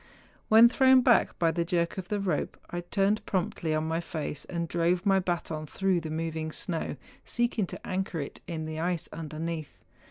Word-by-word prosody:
When 225 +2 +9
thrown 260 +1 +5
back 245 -2 +4
by 165 -1 +3
the 170 +1 0
jerk 170 +1 0
of 180 - -6
the 205 +1 -1
rope, 185 -6 -1
I 175 - -2
turned 195 +4 +1
promptly 185 -3 -1
on 155 - 0
my 165 +1 0
face, 155 -3 -5
and 170 -2 -3
drove 175 +3 +1
my 195 -1 +5
baton 170 -4 -3
through 190 +1 +1
the 160 - -5
moving 160 0 -3
snow, 165 0 -3 0.3
seeking 240 -4 0
to - - -8
anchor 185 -2 -2
it 140 - -6
in 160 -3 -4
the 155 0 -4
ice 170 0 -1
underneath. 160 0 -5
170 Hz, 185 wpm, -29 LUFS, 160-195 Hz, 0.3 s, When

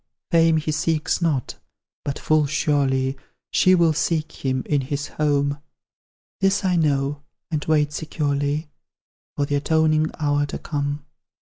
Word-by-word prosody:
Fame 165 -1 +5
he 155 0 -1
seeks 155 +1 0
not 150 -7 -1 0.4
but 140 - -3
full 155 -2 +2
surely 135 -3 +1 0.4
She 185 0 +5
will 170 -3 +4
seek 155 0 -2
him, 130 -1 0
in 145 -2 +1
his 140 +2 -4
home; 145 -1 0 0.8
This 195 +1 +2
I 180 -1 +2
know, 145 -3 +1 0.3
and 150 -2 -1
wait 150 -1 +2
securely 145 -1 -1 0.7
For 145 - 0
the 145 0 0
atoning 155 +1 +2
hour 145 -1 +1
to - - -5
come. 145 -1 -3
150 Hz, 135 wpm, -23 LUFS, 145-160 Hz, 0.8 s, Fame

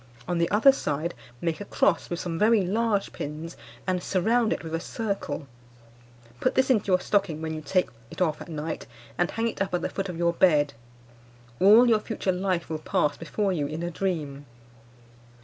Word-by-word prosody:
On 175 -1 0
the 170 - +2
other 220 +7 +6
side 165 - -2 0.3
make 165 +2 -2
a - - -5
cross 190 -3 +1
with 175 - -3
some 165 -2 -3
very 215 -2 +4
large 210 +1 0
pins, 155 +3 -6 0.3
and 185 -1 0
surround 220 +6 +1
it - - -2
with 160 -1 -7
a 165 - 0
circle. 200 -5 -4 0.9
Put 255 - +1
this 260 0 +3
into 215 -5 +2
your 185 -2 +4
stocking 195 -6 0
when 160 0 -3
you 155 - -5
take 180 +5 +1 0.2
it - - -10
off 160 -4 +1
at - - -9
night, 155 0 -4 0.3
and 175 +5 +1
hang 225 +1 -1
it 225 - -4
up 190 -2 0
at 175 - -2
the - - -1
foot 195 -1 -4
of 175 - -5
the 170 0 +2
bed. 150 -5 +3 0.9
All 215 +6 +7
your 225 -2 +4
future 210 -3 -2
life 185 -1 -1
will 160 -1 -3
pass 150 -1 0
before 195 +5 -1
you 150 -5 -1
in 155 +3 -5
a 175 - -2
dream. 150 -7 -3
180 Hz, 200 wpm, -26 LUFS, 160-205 Hz, 0.9 s, All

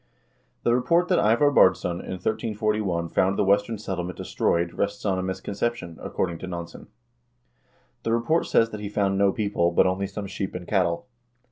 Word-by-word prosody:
The 120 - +3
report 170 +8 +2
that 185 - +4
Ivar 120 +7 +4
Baardsson 95 -7 +3
in - - -5
1341 105 -3 -1
found 95 +3 +1
the - - +3
Western 100 +3 +2
Settlement 90 -3 -4
destroyed 85 0 0
rests 100 +1 -2
on 95 -2 +1
a - - -1
misconception, 100 0 -3
according 85 -3 -2
to 95 - -6
Nansen. 85 -2 -7 1.1
The 115 - -2
report 120 +9 +1
says 115 0 +3
that 105 - -6
he 100 - -4
found 100 -1 0
no 100 -1 +4
people, 100 -5 0
but 85 - +4
only 95 +1 0
some 100 +1 -6
sheep 95 -1 -5
and 90 -1 -6
cattle. 90 -1 +1
100 Hz, 170 wpm, -25 LUFS, 90-110 Hz, 1.1 s, that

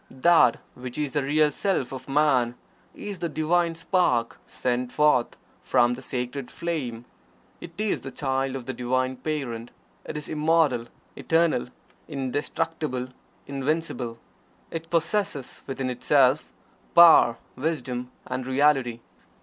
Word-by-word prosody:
That 130 -2 +4 0.2
which 125 -1 -8
is 150 -2 -2
the 145 - +1
Real 150 +2 +3
Self 180 -5 -1
of 130 +1 -8
Man 135 -4 +3 0.4
is 205 -2 -6
the 170 - -2
Divine 165 +2 +1
Spark 145 -10 +1
sent 125 0 -2
forth 150 -5 +2 0.2
from 120 0 +3
the 125 - -7
Sacred 125 +1 -4
Flame. 130 -10 -4 0.5
It 170 - -10
is 215 0 -1
the 135 - -6
Child 135 -1 -1
of 130 -3 -6
the 130 - -4
Divine 130 +1 -1
Parent. 125 -5 -4 0.3
It 150 - -6
is 150 - -5
Immortal 155 -6 +2 0.3
Eternal 165 - +1 0.4
Indestructible 140 0 -3 0.4
Invincible. 135 -4 -2 0.5
It 165 0 -5
possesses 170 -4 -1
within 135 -1 -2
itself 130 +2 +3 0.4
Power, 165 -9 +8 0.2
Wisdom, 125 -4 -3 0.2
and 130 0 -4
Reality. 130 -3 +2
135 Hz, 125 wpm, -26 LUFS, 125-160 Hz, 0.5 s, Power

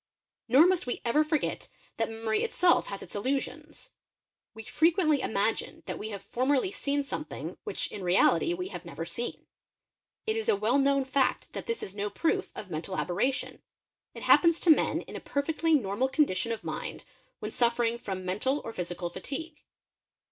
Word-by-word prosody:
Nor 265 +7 +7
must 360 -7 +2
we 245 - -2
ever 270 +6 +4
forget 305 -1 -1 0.3
that 225 - 0
memory 225 -1 -1
itself 365 -6 +3
has 200 - -5
its - - -9
llusions: 260 +7 -3 0.6
we 220 - -8
frequently 315 - +3
imagine 220 +1 -1
that - - -5
we 215 - -5
have 200 -2 -6
formerly 265 - +1
seen 285 -7 -1
something 300 +2 -6
hich 420 - -1
in 200 - -6
reality 180 - +3
we 365 +1 -4
have 175 - -7
never 165 -2 -6
seen. 235 +8 -4 0.8
It 440 - 0
is 450 -1 -1
a - - +5
well 220 +7 +2
known 275 -1 +3
fact 265 0 0
that - - -6
this 460 0 -2
/no 205 0 -3
proof 325 +10 0
of 185 - -8
mental 170 +4 -4
aberration; 230 +10 -1 0.5
it - - -8
happens 335 -1 +5
to 340 - +6
men 310 - +3
in - - -11
a - - -4
perfectly 315 +3 +1
"normal 235 0 +1
condition 230 - +2
of 225 - -4
mind - - -5 0.3
when - - -5
suffering 235 -1 +1
from 190 -6 -5
mental 235 +10 0
or 225 - -5
physical 175 -1 -4
fatigue. 295 - -6
250 Hz, 170 wpm, -29 LUFS, 200-305 Hz, 0.8 s, Nor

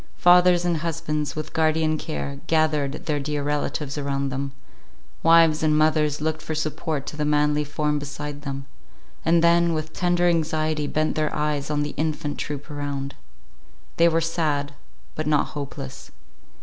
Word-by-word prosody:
Fathers 180 0 +5
and 170 -2 +1
husbands, 155 -2 -2
with 155 0 -5
guardian 155 0 +2
care, 70 - -4
gathered 155 -3 +1
their 150 -2 0
dear 145 0 -2
relatives 145 0 -2
around 140 -1 -1
them; 135 +1 -3 0.7
wives 165 -1 +5
and 155 -1 +3
mothers 155 -1 +2
looked 155 +1 -2
for 155 0 -4
support 155 -1 -2
to - - -6
the 150 - -2
manly 150 0 +2
form 150 0 -1
beside 145 0 -6
them, 140 -2 -5 0.6
and 165 0 +3
then 170 0 +4
with 155 0 -4
tender 175 -1 +2
anxiety 155 -2 +1
bent 155 +1 0
their 155 -1 0
eyes 150 -1 -1
on 145 -1 0
the 145 - -4
infant 155 -1 -2
troop 145 0 -5
around. 140 -1 -4 0.8
They 170 0 +6
were 165 0 +1
sad, 150 -4 -1 0.4
but 155 0 -3
not 150 -2 +2
hopeless. 140 -2 -7
150 Hz, 155 wpm, -24 LUFS, 145-160 Hz, 0.8 s, They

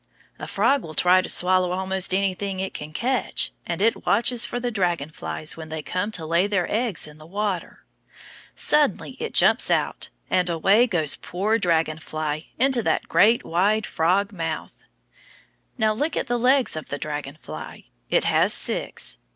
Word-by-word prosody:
A - - -6
frog 280 0 +2
will 155 -4 -8
try 180 +1 +5
to - - -6
swallow 185 0 +3
almost 190 0 +1
anything 195 0 -1
it 190 0 -3
can 150 +1 -7
catch, 250 +10 -1 0.2
and 170 +3 -2
it 225 - +1
watches 235 +3 +3
for 245 - -4
the 245 0 -2
dragon 175 -7 -1
flies 155 0 -4
when 160 -1 -9
they 155 -1 -5
come 185 +6 -2
to 165 -5 -2
lay 170 +4 +2
their 195 -4 0
eggs 220 -7 -1
in 150 0 -14
the 155 - -13
water. 200 -1 -4 0.7
Suddenly 300 -1 +1
it 460 - -5
jumps - - +5
out, - - 0 0.2
and 180 -1 +1
away 195 +8 +3
goes 160 - +2
poor 210 +6 -1
dragon 160 -4 +1
fly 155 0 -4
into 260 0 +2
that - - -1
great 230 +3 +4
wide 205 +6 +1
frog 185 +5 +1
mouth. 165 -5 -5 0.9
Now 220 -2 +2
look 295 +8 -2
at - - 0
the 245 0 -1
legs 255 -1 +3
of 155 - -7
the 140 - -3
dragon 145 -1 -5
fly. 75 - -9 0.3
It - - +2
has - - +2
six. - - -2
185 Hz, 175 wpm, -23 LUFS, 160-220 Hz, 0.9 s, try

